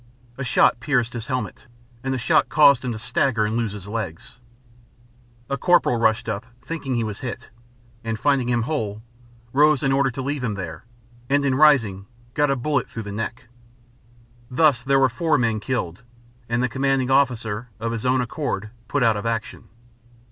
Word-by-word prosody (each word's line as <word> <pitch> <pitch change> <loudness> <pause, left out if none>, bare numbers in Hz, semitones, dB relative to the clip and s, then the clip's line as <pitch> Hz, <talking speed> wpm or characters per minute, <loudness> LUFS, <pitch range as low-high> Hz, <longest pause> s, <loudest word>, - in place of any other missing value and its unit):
A 135 - -5
shot 120 -1 +3
pierced 125 -3 0
his 115 -1 -5
helmet, 130 -1 -4 0.4
and 135 - -2
the 130 - 0
shock 125 - +2
caused 140 -4 +5
him 125 - -2
to 110 - -4
stagger 115 -1 +1
and 110 +1 -2
lose 115 -3 -1
his 100 -2 -9
legs. 115 +3 -6 1.1
A 140 -1 -3
corporal 175 -8 +3
rushed 115 +1 +2
up, 105 -1 -2 0.2
thinking 140 -4 -3
he 115 - 0
was 105 -2 -5
hit, 125 -2 -6 0.5
and, 115 -1 -3
finding 135 -3 +2
him 120 -1 +1
whole, 110 -6 -3 0.5
rose, 150 0 +4
in 135 - +2
order 135 0 +3
to 130 +1 -5
leave 140 0 -3
him 110 -4 -1
there, 85 -2 -7 0.4
and, 140 +1 +2
in 135 - +2
rising, 120 -10 +4 0.3
got 145 +1 +2
a 135 - +2
bullet 135 0 -1
through 115 - -6
the 100 - -7
neck. 115 +4 -5 1.0
Thus 135 -1 +3
there 135 +2 +2
were 135 -1 +5
four 150 +6 +1
men 115 -3 +1
killed, 105 -6 -3 0.5
and 120 +1 +1
the - - +2
Commanding 135 +1 0
Officer, 120 -4 +1
of 115 +1 -2
his 115 -2 -4
own 130 0 +2
accord, 115 -5 -3 0.2
put 145 +1 0
out 110 -3 +3
of 105 - -3
action. 115 -2 -4
125 Hz, 185 wpm, -23 LUFS, 110-135 Hz, 1.1 s, caused